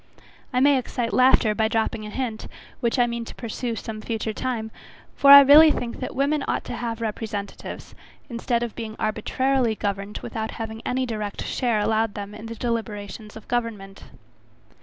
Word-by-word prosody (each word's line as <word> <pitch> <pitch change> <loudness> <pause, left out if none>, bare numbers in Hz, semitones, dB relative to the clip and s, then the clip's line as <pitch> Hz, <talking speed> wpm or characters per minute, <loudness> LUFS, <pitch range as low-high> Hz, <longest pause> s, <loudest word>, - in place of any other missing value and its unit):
I 250 - +1
may 280 -1 +5
excite 240 -1 -3
laughter, 255 -4 +5
by 220 +1 +1
dropping 220 -1 -1
an 210 - -8
hint, 245 -5 -4 0.3
which 235 0 0
I 245 - +4
mean 235 -1 -3
to - - -10
pursue, 235 0 -4
some 215 0 -6
future 220 -1 -3
time, 225 -2 -3 0.4
for 280 - +4
I 280 0 +13
really 295 +3 +8
think 240 -5 -3
that 255 - -5
women 280 +2 +1
ought - - -1
to - - -6
have 230 -1 -4
representatives, 210 -2 -5 0.3
instead 235 -1 -1
of 235 - -4
being 220 -2 -6
arbitrarily 235 +2 0
governed 200 0 -3
without 220 -1 -4
having 225 0 -5
any 260 +1 0
direct 215 -4 -4
share 240 -4 0
allowed 220 0 0
them 205 0 -6
in 215 +2 -9
the 230 - -6
deliberations 215 -3 -4
of 220 - -13
government. 215 -5 -4
230 Hz, 175 wpm, -24 LUFS, 215-245 Hz, 0.4 s, I